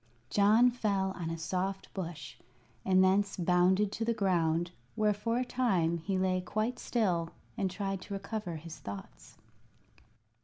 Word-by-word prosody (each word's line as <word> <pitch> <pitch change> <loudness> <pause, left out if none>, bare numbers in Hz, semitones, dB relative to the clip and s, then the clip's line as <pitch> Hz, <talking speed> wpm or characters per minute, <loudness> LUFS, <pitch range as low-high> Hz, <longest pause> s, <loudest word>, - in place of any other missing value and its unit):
John 215 +5 +5
fell 200 -5 0
on 175 -3 -4
a 165 - -3
soft 185 +3 -3
bush, 175 -4 -6 0.5
and 185 0 +4
thence 195 +1 +2
bounded 185 +3 +3
to 225 - -3
the 230 0 +1
ground, 175 -4 +1 0.2
where 215 -1 +3
for 230 +3 -1
a 250 - 0
time 185 -10 +1
he 190 +4 -1
lay 185 0 +1
quite 215 +6 -2
still 180 -8 0 0.3
and 190 - 0
tried 195 0 -3
to 200 - -7
recover 200 -3 -4
his 160 +1 -8
thoughts. 100 -1 -9
190 Hz, 150 wpm, -31 LUFS, 175-210 Hz, 0.5 s, John